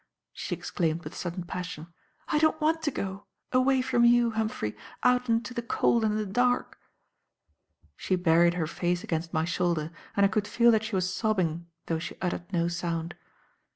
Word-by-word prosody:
she - - -4
exclaimed 165 -1 -2
with 150 - -8
sudden 175 +1 -4
passion, 175 -2 -6 0.3
"I 300 - +2
don't 315 0 +3
want 320 +1 +1
to 315 - 0
go 195 -5 -5 0.2
away 255 0 +3
from 250 -2 +2
you, 240 0 +5
Humphrey, 220 - -2 0.3
out 250 0 +3
into 230 +2 0
the 240 - -2
cold 235 0 +2
and 215 -1 +1
the 215 - -1
dark!" 245 +5 0 1.2
She 185 - 0
buried 170 -1 +4
her 170 -3 0
face 175 +3 -1
against 165 -5 -3
my 160 0 0
shoulder, 170 -2 0 0.3
and 200 - +6
I - - +4
could 205 +1 0
feel 235 +2 +4
that 220 -1 +2
she 220 -2 -3
was 185 0 0
sobbing 175 -7 0 0.2
though 165 -1 -1
she - - -6
uttered 180 0 -3
no 170 -2 +1
sound. 170 -1 -3
190 Hz, 180 wpm, -28 LUFS, 170-235 Hz, 1.2 s, and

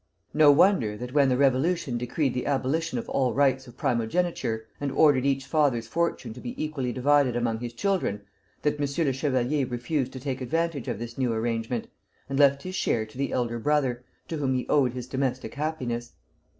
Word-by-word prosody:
No 150 -1 +6
wonder 140 - +3
that 125 +2 -7
when 140 -2 +4
the 125 - +2
Revolution 135 0 +1
decreed 125 +2 -1
the 125 - -3
abolition 145 +4 0
of 235 - -4
all 130 -2 0
rights 130 -1 +2
of 120 0 -14
primogeniture, 115 -2 -1
and 145 -1 -2
ordered 140 -2 +4
each 135 -1 0
father's 135 -6 +1
fortune 165 -6 -1
to 125 - -11
be 120 - -6
equally 150 -5 -2
divided 130 0 +3
among 120 -2 0
his 120 0 -5
children, 120 - -1 0.4
that 150 0 0
M. 145 +3 0
le 135 - +1
Chevalier 135 0 0
refused 130 +2 -2
to 130 - -6
take 130 0 -4
advantage 160 +1 -1
of - - -2
this 120 +3 -7
new 125 -2 +1
arrangement, 115 +1 -2 0.4
and 135 0 -2
left 140 -1 +4
his 185 - -5
share 115 - 0
to 110 - -18
the 140 - -1
elder 120 -1 -1
brother, 130 -2 +1 0.2
to 160 - -4
whom 135 -3 0
he 125 - -2
owed 135 -5 +3
his 125 -1 -5
domestic 130 -3 -2
happiness. 125 -6 -3
130 Hz, 190 wpm, -26 LUFS, 120-145 Hz, 0.4 s, No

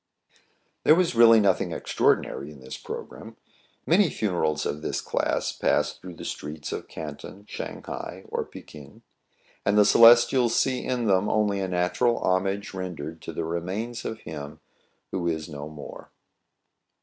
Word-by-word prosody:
There 155 - +7
was 180 -1 +2
really 115 -1 +7
nothing 100 -3 +2
extraordinary 70 +2 0
in 75 -2 -12
this 65 0 -8
programme. - - -8 0.5
Many 180 +2 +4
funerals 80 - -1
of 75 - -3
this - - -2
class - - -1
pass - - +1
through 90 -2 -11
the - - -9
streets 75 0 -6
of - - -5
Canton, 100 +2 -8
Shang - - -6
hai, - - -7
or - - -2
Fekin; 70 -3 -13 0.6
and 100 +1 +2
the 105 - +7
Celestials 120 +2 +6
see 130 -2 +1
in 125 -2 -1
them 100 0 +2
only 105 -2 +1
a 95 - -1
natural 95 +7 +1
hom 95 +1 +1
age 100 +1 -4
rendered 85 -4 -6
to - - -6
the 80 +1 -3
remains 95 +8 -4
of 110 0 -5
him 75 -2 -8 0.5
who 90 -2 -2
is 80 -2 -2
no 75 -1 -7
more. 75 -2 -10
95 Hz, 155 wpm, -26 LUFS, 80-115 Hz, 0.6 s, There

